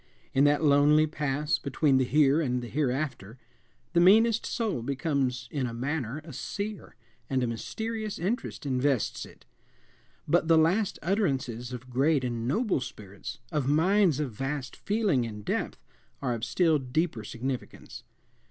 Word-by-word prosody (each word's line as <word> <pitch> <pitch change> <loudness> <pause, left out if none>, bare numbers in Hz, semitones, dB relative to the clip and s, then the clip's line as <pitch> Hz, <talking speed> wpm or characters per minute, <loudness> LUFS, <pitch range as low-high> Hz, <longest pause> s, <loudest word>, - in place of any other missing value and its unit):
In 135 +2 +4
that 145 +2 +3
lonely 150 +1 +5
pass 150 0 -1
between 140 0 +2
the 130 - +3
here 145 +3 +3
and 125 -4 -1
the - - -5
hereafter 130 -5 -2 0.6
the 170 - +4
meanest 220 +5 +5
soul 220 - -1
becomes 135 -2 -1
in 135 -4 -1
a 115 - -6
manner 135 +1 -3
a 155 -2 -10
seer, 205 - -5 0.3
and 130 -2 +1
a - - +1
mysterious 220 - -4
interest 195 - -3
invests 130 -2 0
it. - - -18 0.8
But 160 +1 +2
the 165 -1 +5
last 185 +6 +2
utterances 135 - -1
of 125 0 -8
great 140 +2 +2
and 120 -2 -2
noble 210 - +1
spirits, 100 -6 -8
of 145 -4 -1
minds 165 +1 +3
of 145 -5 -2
vast 135 +2 -4
feeling 205 - +1
and 105 -2 -8
depth, - - -2 0.4
are 125 -3 -1
of 115 -2 -5
still 160 +4 +2
deeper 135 -1 -1
significance. 125 +3 -6
145 Hz, 150 wpm, -28 LUFS, 125-165 Hz, 0.8 s, lonely